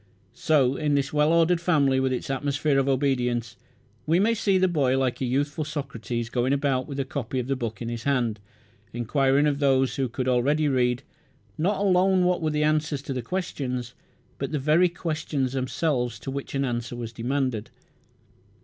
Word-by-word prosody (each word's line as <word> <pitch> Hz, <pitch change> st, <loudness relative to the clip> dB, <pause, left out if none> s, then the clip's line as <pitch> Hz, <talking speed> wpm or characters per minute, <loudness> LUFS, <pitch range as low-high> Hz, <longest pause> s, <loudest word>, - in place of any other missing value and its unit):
So, 140 Hz, -4 st, +2 dB
in 150 Hz, -2 st, +1 dB
this 140 Hz, 0 st, -1 dB
well 150 Hz, +1 st, +3 dB
ordered 170 Hz, +1 st, +3 dB
family 140 Hz, -6 st, +3 dB
with 130 Hz, 0 st, +1 dB
its 130 Hz, +1 st, -3 dB
atmosphere 140 Hz, +1 st, 0 dB
of 135 Hz, 0 st, +1 dB
obedience, 125 Hz, -4 st, 0 dB, 0.5 s
we 165 Hz, +3 st, +3 dB
may 220 Hz, +4 st, +3 dB
see 205 Hz, -4 st, +2 dB
the 185 Hz, 0 st, +3 dB
boy, 140 Hz, -7 st, +1 dB
like 130 Hz, -2 st, -1 dB
a -, -, +1 dB
youthful 140 Hz, +4 st, -1 dB
Socrates 125 Hz, -6 st, -4 dB
going 125 Hz, +3 st, 0 dB
about 135 Hz, -2 st, 0 dB
with 140 Hz, -2 st, -5 dB
a 135 Hz, -, 0 dB
copy 130 Hz, -2 st, -4 dB
of 125 Hz, -, -1 dB
the 135 Hz, +1 st, -1 dB
book 115 Hz, -4 st, -4 dB
in -, -, -4 dB
his 120 Hz, -1 st, -4 dB
hand, 120 Hz, -5 st, 0 dB, 0.5 s
enquiring 135 Hz, +4 st, +2 dB
of 145 Hz, -1 st, +1 dB
those, 135 Hz, -2 st, +2 dB
who 135 Hz, -2 st, 0 dB
could 130 Hz, +2 st, -3 dB
already 140 Hz, +5 st, +2 dB
read, 125 Hz, -1 st, +1 dB, 0.5 s
not 190 Hz, +6 st, 0 dB
alone 190 Hz, -1 st, +3 dB
what 180 Hz, -1 st, +1 dB
were 160 Hz, -, 0 dB
the 150 Hz, 0 st, 0 dB
answers 150 Hz, -2 st, 0 dB
to 145 Hz, -4 st, -4 dB
the 125 Hz, -, -3 dB
questions 125 Hz, -6 st, -4 dB, 0.5 s
but 140 Hz, -, -3 dB
the 155 Hz, -, 0 dB
very 155 Hz, +6 st, +3 dB
questions 155 Hz, -6 st, -2 dB
themselves 130 Hz, -2 st, -1 dB
to 135 Hz, -, -6 dB
which 140 Hz, +1 st, -5 dB
an 135 Hz, 0 st, +1 dB
answer 120 Hz, -1 st, -3 dB
was 115 Hz, -1 st, -6 dB
demanded. 125 Hz, -2 st, -2 dB
135 Hz, 185 wpm, -25 LUFS, 125-150 Hz, 0.5 s, well